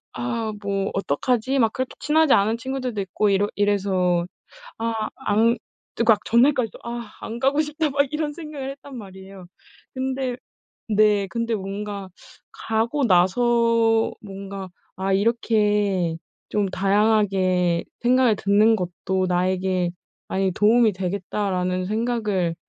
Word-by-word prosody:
'아, 230 -3 -2
뭐 195 -1 -2
어떡하지?' 235 - 0
막 225 -3 +3
그렇게 260 0 -3
친하지 310 0 +3
않은 215 +3 +3
친구들도 255 -3 -3
있고 195 +2 0
이러 200 +1 +2
이래서 190 -4 +1 0.5
아 225 -1 -2 0.2
안 225 +3 +3 0.4
그러니까 225 -2 +4
전날까지도 245 -1 +2
'아, 235 -2 -6
안 230 - -6
가고 275 +4 +2
싶다.' 305 0 -1
막 280 +1 +2
이런 300 -1 -2
생각을 295 -4 -6
했단 275 -1 -12
말이에요. 190 -3 -11 0.5
근데 260 -1 -2 0.5
네 210 -2 +3
근데 230 +2 -2
뭔가 200 0 -5 0.4
가고 230 +6 -1
나서 230 +4 +3
뭔가 195 -1 -8 0.3
'아, 190 +1 -1
이렇게 205 -4 +1 0.3
좀 205 -2 0
다양하게 195 -3 +2 0.2
생각을 245 -2 +3
듣는 210 +3 +4
것도 185 0 -2
나에게 185 0 0 0.4
많이 190 0 0
도움이 220 +3 +4
되겠다.'라는 185 -1 -2
생각을 215 -5 -1
210 Hz, 265 characters per minute, -23 LUFS, 190-235 Hz, 0.5 s, 그러니까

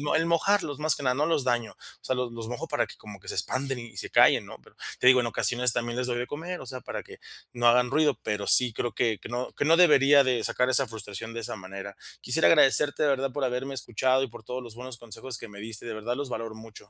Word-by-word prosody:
el 165 +1 +2
mojarlos, 170 -3 +1
más 155 0 +3
que - - -8
nada, 125 -1 +1
no 145 +3 +1
los 160 -4 +1
daño. 120 -3 -1
O - - -17
sea, 130 - -1
los 125 -1 -3
los 115 -1 -6
mojo 120 0 -5
para - - 0
que - - -12
como 105 -2 -12
que - - -19
se - - -4
expanden 130 +7 -2
y 115 -4 -11
se - - -4
callen, - - +5
¿no?, - - -11
pero, - - -22 0.2
te - - +2
digo, 130 0 +7
en - - -2
ocasiones 120 +2 +3
también 120 0 -3
les 125 - 0
doy 120 -1 -2
de 125 - -2
comer, 175 +4 -6
o - - -9
sea, 130 -1 -7
para - - -6
que - - -14 0.3
no 120 -1 +1
hagan 125 +1 +4
ruido. 150 -1 +2
Pero 105 -1 -3
sí 125 -1 +6
creo 120 -1 -3
que 110 -1 0
que - - -10
no 120 +1 -4
que - - -2
no 160 +2 +5
debería 145 -5 +6
de 125 -3 0
sacar 125 0 0
esa 130 0 +2
frustración 110 0 -7
de 115 - -5
esa 110 - -6
manera. 95 +1 -9 0.3
Quisiera 85 - +3
agradecerte, 145 - +4
de 150 - +3
verdad, 135 -1 0
por 145 - -3
haberme 130 +2 -2
escuchado 130 +1 0
y - - -2
por 120 -1 -13
todos 125 +3 -6
los 115 -2 -10
buenos 125 0 -7
consejos 120 +1 -5
que 115 - -9
me 100 -1 -12
diste. 110 +1 -4
De 115 - -5
verdad, 115 +3 -3
los 140 0 -5
valoro 115 -2 -5
mucho. 110 -2 -14
125 Hz, 275 wpm, -27 LUFS, 115-135 Hz, 0.3 s, digo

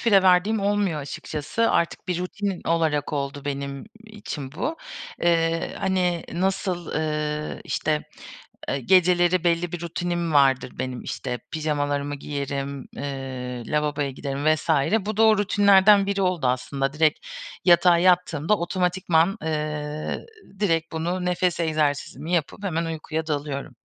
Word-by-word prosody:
fire 200 -5 +5
verdiğim 190 +4 +4
olmuyor 200 -6 +1
açıkçası. 150 +9 -2
Artık 170 +2 0
bir 180 -1 0
rutin 190 +1 -3
olarak 155 -3 +1
oldu 140 0 -3
benim 140 -1 -4 0.2
için 180 -11 -7
bu. 280 - -3 0.5
Eee, 165 -1 +1
hani 180 -3 0
nasıl, 185 -1 -1
ııı, 150 -1 -2
işte, 155 -1 -1 0.7
eee, 140 - -1
geceleri 175 +3 +4
belli 170 0 +1
bir 175 -1 -5
rutinim 170 -1 -2
vardır 135 -3 +4
benim. 130 -1 -3
İşte 125 -2 -4
pijamalarımı 145 -2 -1
giyerim, 140 -1 -4
eee, 130 -3 -5
lavaboya 150 -1 0
giderim 140 +2 -4
vs. 160 - -10 0.4
Bu 215 0 -3
da 225 - +5
o 220 -1 +6
rutinlerden 200 0 +5
biri 200 0 -1
oldu 180 -8 +1
aslında. 135 +2 -1
Direkt 155 0 +2 0.5
yatağa 175 -1 +6
yattığımda 180 0 +3
otomatikman, 180 +1 +1
eee, 150 -1 -3 0.3
direkt 165 -5 +1
bunu, 175 +3 -2
nefes 180 -1 0
egzersizimi 155 0 -1
yapıp 170 +4 -1
hemen 170 -4 -1
uykuya 160 0 -4
dalıyorum. 145 -2 -3
165 Hz, 130 wpm, -24 LUFS, 145-180 Hz, 0.7 s, o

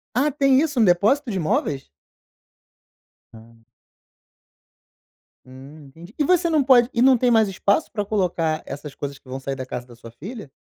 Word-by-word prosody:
Ah, 285 +5 +2
tem 275 -2 +3
isso, 295 -5 -1
um - - +5
depósito 215 +9 +2
de 195 - -2
móveis? 150 -3 -2 1.5
Ah. 115 0 -17 1.8
Hum, 135 +3 -14
entendi. 165 - -15
E 300 - +1
você 350 +2 +2
não 310 -3 +2
pode 250 -2 +5
e 235 - 0
não 260 0 +5
tem 245 +1 +1
mais 220 -3 +3
espaço 200 - 0
pra 205 -2 -3
colocar 175 -6 -1
essas 140 +1 -8
coisas 140 -1 -6
que - - -26
vão 130 +1 -6
sair 135 0 -4
da 130 -1 -6
casa 125 -1 -6
da 120 -1 -16
sua 115 0 -13
filha? 195 - -10
190 Hz, 175 wpm, -22 LUFS, -, 1.8 s, um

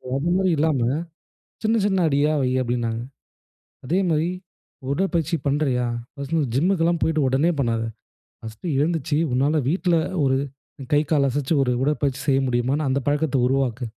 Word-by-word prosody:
அதுமாதிரி 180 +6 +1
இல்லாம 150 -2 +2 0.8
சின்ன 220 +1 +2
சின்ன 190 -3 +2
அடியா 145 +1 +2
வை 130 -1 +1
அப்படின்னாங்க. 120 -2 -2 0.8
அதேமாதிரி 165 0 +1 0.6
உடற்பயிற்சி 170 0 0
பண்றியா? 140 -3 +1 0.3
ஃபர்ஸ்ட்டு 140 +3 -3
வந்து 135 -7 -1
ஜிம்க்குலாம் 170 +2 +2
போய்ட்டு 155 -3 +1
உடனே 135 +7 +2
பண்ணாத. 115 -4 0 0.6
ஃபர்ஸ்ட்டு 115 +9 -6
எழுந்திரிச்சு 150 -1 0 0.2
உன்னால 145 +4 +2
வீட்ல 175 +1 +1 0.3
ஒரு 130 -1 +2 0.6
கை 145 - +5
கால் 140 -3 +3
அசச்சு 140 +3 -1
ஒரு 125 - 0
உடற்பயிற்சி 140 -1 0
செய்ய 135 -1 +3
முடியுமான்னு 130 +4 0
அந்த 135 +1 0
பழக்கத்த 145 -1 +1
உருவாக்கு. 130 -2 0
145 Hz, 135 wpm, -23 LUFS, 130-165 Hz, 0.8 s, கை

